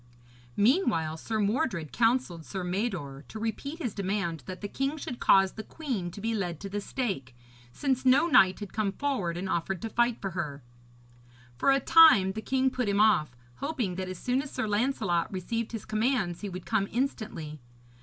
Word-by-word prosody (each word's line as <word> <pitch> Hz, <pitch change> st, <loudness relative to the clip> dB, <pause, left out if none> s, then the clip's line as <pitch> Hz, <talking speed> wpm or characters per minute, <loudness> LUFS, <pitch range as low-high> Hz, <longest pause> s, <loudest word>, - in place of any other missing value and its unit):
Meanwhile, 200 Hz, -, +2 dB
Sir 220 Hz, +6 st, -3 dB
Mordred 205 Hz, -, 0 dB
counselled 225 Hz, -8 st, +1 dB
Sir 190 Hz, +3 st, -5 dB
Mador 180 Hz, -, -3 dB
to -, -, -8 dB
repeat 230 Hz, +7 st, -4 dB
his 250 Hz, -, -3 dB
demand 190 Hz, -4 st, -2 dB
that 185 Hz, -1 st, -7 dB
the 205 Hz, -, -3 dB
king 275 Hz, +7 st, -2 dB
should 250 Hz, -4 st, -6 dB
cause 195 Hz, -1 st, +5 dB
the 220 Hz, -, -7 dB
queen 245 Hz, -, -4 dB
to 175 Hz, -, -10 dB
be 225 Hz, +2 st, -1 dB
led 175 Hz, -7 st, -2 dB
to 200 Hz, -, -5 dB
the 205 Hz, +1 st, -3 dB
stake, 190 Hz, -, -3 dB, 0.4 s
since 265 Hz, -, -1 dB
no 260 Hz, +4 st, +5 dB
knight 215 Hz, -, +5 dB
had 205 Hz, -, -7 dB
come 205 Hz, -2 st, 0 dB
forward 200 Hz, -11 st, -2 dB
and 190 Hz, +2 st, -3 dB
offered 185 Hz, +1 st, -1 dB
to 225 Hz, -, -4 dB
fight 240 Hz, 0 st, +2 dB
for 195 Hz, -, -4 dB
her. 150 Hz, -6 st, -4 dB, 0.9 s
For 120 Hz, -, +1 dB
a 270 Hz, -, +4 dB
time 270 Hz, -, +7 dB
the 220 Hz, +3 st, -5 dB
king 265 Hz, +2 st, +1 dB
put 250 Hz, -4 st, -1 dB
him 200 Hz, 0 st, +1 dB
off, 155 Hz, -, +3 dB, 0.2 s
hoping 265 Hz, -, -2 dB
that 185 Hz, -1 st, -3 dB
as 185 Hz, -, -6 dB
soon 250 Hz, +7 st, 0 dB
as 290 Hz, -, -8 dB
Sir 220 Hz, -, -3 dB
Lancelot 205 Hz, -6 st, 0 dB
received 220 Hz, +5 st, -3 dB
his 225 Hz, -3 st, -6 dB
commands 215 Hz, -5 st, 0 dB
he 205 Hz, -, -4 dB
would 180 Hz, -1 st, -7 dB
come 210 Hz, -3 st, +1 dB
instantly. 215 Hz, -, -3 dB
205 Hz, 190 wpm, -28 LUFS, 180-250 Hz, 0.9 s, time